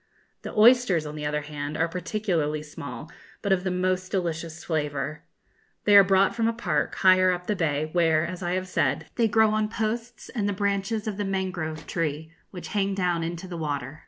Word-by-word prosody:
The - - -8
oysters, 220 -7 +5
on 150 - -6
the 150 -1 -3
other 150 0 -1
hand, 145 0 -5
are 165 +1 +2
particularly 170 -4 -2
small, 150 +1 -8 0.3
but 200 - 0
of 185 -1 +2
the 190 - 0
most 185 0 -1
delicious 170 -3 -3
flavour. 150 -2 -2 0.6
They 205 - +5
are 200 - +10
brought 195 0 +3
from 230 -1 +1
a 230 - +1
park, 175 -10 -1
higher 185 -1 +5
up 180 0 -3
the 210 - 0
bay, 155 -4 0
where, 165 -2 +3
as 180 +1 -6
I 175 0 -1
have 185 0 -2
said, 145 -3 0
they 230 -2 +2
grow 220 0 +4
on 215 0 0
posts 230 +2 -4
and 205 -5 -1
the - - 0
branches 200 +2 -1
of 205 -2 -3
the 205 - -1
mangrove 185 -5 -3
tree, 160 -1 -3 0.2
which 180 - -8
hang 200 -2 0
down 180 -3 0
into 170 +2 -4
the 175 -2 -6
water. 145 -2 -4
180 Hz, 200 wpm, -26 LUFS, 155-200 Hz, 0.6 s, are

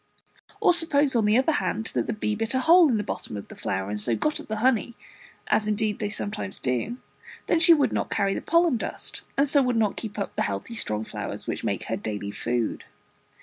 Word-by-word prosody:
Or - - +5
suppose 295 -5 +3
on 225 -3 +3
the 210 +2 +4
other 265 +5 +3
hand 225 -6 -1
that - - -1
the - - -1
bee 215 0 -2
bit 225 +3 -2
a 260 - +2
hole 335 +1 +6
in 235 - +2
the 210 - -1
bottom 110 - -5
of 100 - -9
the - - -10
flower, 95 +1 -3
and 105 0 -2
so 115 +2 +1
got 305 - -1
at - - -10
the 220 - -2
honey, 235 0 +1 0.5
as 215 - +1
indeed 215 0 0
they 210 - -2
sometimes 205 - -4
do; 130 - -2 0.5
then 335 - +2
she 335 0 +7
would 280 -5 +1
not - - -1
carry 195 -1 +1
the - - -3
pollen 335 -5 +3
dust, - - -6 0.2
and 280 +1 +4
so 285 0 +4
would 250 -3 +1
not 215 -3 +1
keep 215 -2 -6
up 200 - -4
the - - -1
healthy 100 - -3
strong 110 - -2
flowers - - -5
which - - -4
make - - -1
her - - -3
daily 105 -1 -4
food. 120 +1 -2
220 Hz, 230 wpm, -26 LUFS, -, 0.5 s, she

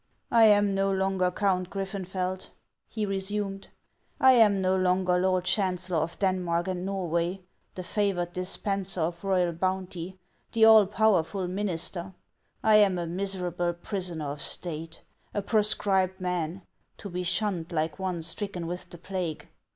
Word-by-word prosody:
" - - -44
I 230 -1 +7
am 205 -2 +5
no 195 0 +1
longer 190 -1 +1
Count 185 -1 0
Griffenfeld," 190 -1 -4 0.4
he 215 -2 -3
resumed. 195 0 -2 0.3
" - - -41
I 260 - +7
am 220 -5 +5
no 185 0 +2
longer 185 -1 +2
lord 185 0 +1
chancellor 185 -3 0
of 165 +2 -3
Denmark 180 -3 0
and 180 -1 -3
Norway, 180 -1 -1 0.3
the 185 - -5
favored 180 -3 -1
dispenser 190 0 -1
of 170 +2 -2
royal 185 -3 +2
bounty, 185 0 -3 0.4
the 225 -1 +5
all 220 -3 +8
powerful 195 -3 +1
minister. 185 -1 -3 0.5
I 215 -1 +6
am 200 -3 +4
a 175 - -2
miserable 180 -1 -2
prisoner 175 -4 -4
of 145 0 -6
State, 165 -1 -4 0.3
a 205 - -1
proscribed 195 -3 +1
man, 180 0 -2 0.3
to - - -8
be 180 -1 -4
shunned 180 -2 -1
like 160 +2 -1
one 180 -3 -2
stricken 180 0 -4
with 175 +2 -5
the 175 - -10
plague. 180 -3 -5
185 Hz, 150 wpm, -28 LUFS, 175-195 Hz, 0.5 s, all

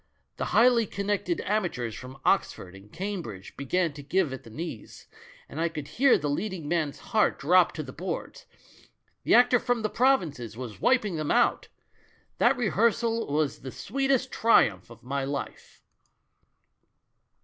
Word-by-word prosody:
The - - -2
highly 235 -2 +4
connected 205 - -2
amateurs 175 - -2
from 130 +3 -10
Oxford 90 -1 0
and 95 +2 -15
Cambridge 170 - -6
began 165 +4 -1
to 145 - -9
give 160 0 0
at 130 - -7
the - - -14
knees, 120 -2 -8 0.4
and 160 - -6
I 170 - +1
could 150 -3 -7
hear 270 +1 +4
the 150 -5 -3
leading 170 +2 -3
man's 155 -3 -1 0.2
heart 215 -1 +3
drop 175 +4 +4
on - - -15
to 155 - -4
the 130 -2 -10
boards; 185 +3 -6 0.7
the - - +3
actor 245 0 +5
from 245 -1 -1
the 215 - -1
provinces 160 - +1
was 120 -4 -8
wiping 215 -9 +2
them 155 -1 -3
outl - - +2 0.7
That - - +4
rehearsal 230 -2 +1
was 150 -1 0
the 135 - -8
sweetest 270 - -1
triumph 110 - +3
of 115 - -15
my 135 +2 -2
life. 140 +1 -6
170 Hz, 155 wpm, -27 LUFS, 135-225 Hz, 0.7 s, actor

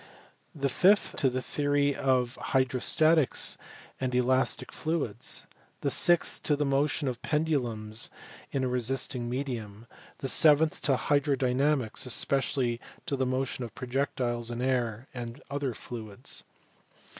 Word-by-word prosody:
The 140 -2 0
fifth 190 +10 +3
to 135 - +3
the 130 0 -3
theory 145 0 +1
of 130 -2 +1
hydrostatics 135 +4 +2 0.4
and 130 -1 -1
elastic 130 +1 +1
fluids. 140 -8 -2 0.4
The - - 0
sixth 175 -1 +3
to 150 - +1
the 145 0 0
motion 140 +1 +1
of 125 -2 -3
pendulums 120 -9 -1 0.4
in 135 - -1
a - - +1
resisting 125 0 -1
medium. 120 -5 -4 0.3
The 135 - -3
seventh 155 +3 +5
to 135 - +4
hydro 145 +1 +2
dynamics, 130 -1 +1
and - - 0
especially 125 -2 +1 0.2
to 140 - -1
the 130 -1 0
motion 130 0 -2
of 115 - -8
projectiles 125 -3 -2
in 120 0 -4
air 125 -2 -1
and 120 -1 -6
other 140 -4 -2
fluids. 110 -4 -7
130 Hz, 135 wpm, -29 LUFS, 120-145 Hz, 0.4 s, seventh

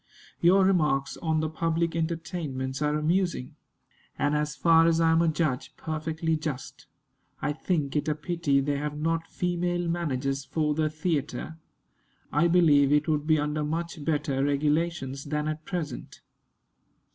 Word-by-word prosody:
Your 185 +3 +5
remarks 150 -7 +2
on 160 -2 0
the 155 - 0
public 165 +1 -1
entertainments 160 -5 -3
are 150 0 +1
amusing, 170 -3 0 0.6
and, 145 +1 +1
as 150 0 -1
far 165 -1 +5
as 165 0 +3
I 165 -1 +4
am 165 +1 +4
a 170 - +3
judge, 150 -5 -1
perfectly 160 +1 -2
just. 155 -4 -6 0.5
I 150 - -1
think 150 -3 -1
it 150 - 0
a 150 - +1
pity 150 -3 0
they 140 +1 -1
have 150 0 -3
not 165 +2 -1
female 175 0 -1
managers 140 -5 -1
for 150 +1 0
the 155 0 +1
theatre. 155 0 -3 0.7
I 150 +4 +3
believe 150 -5 +5
it 150 +1 +3
would 150 -1 0
be 155 -1 +4
under 150 +1 -1
much 165 +1 -3
better 145 -3 0
regulations 145 -1 0
than 150 +1 -2
at 155 0 -4
present. 175 -5 -5
155 Hz, 150 wpm, -27 LUFS, 145-165 Hz, 0.7 s, Your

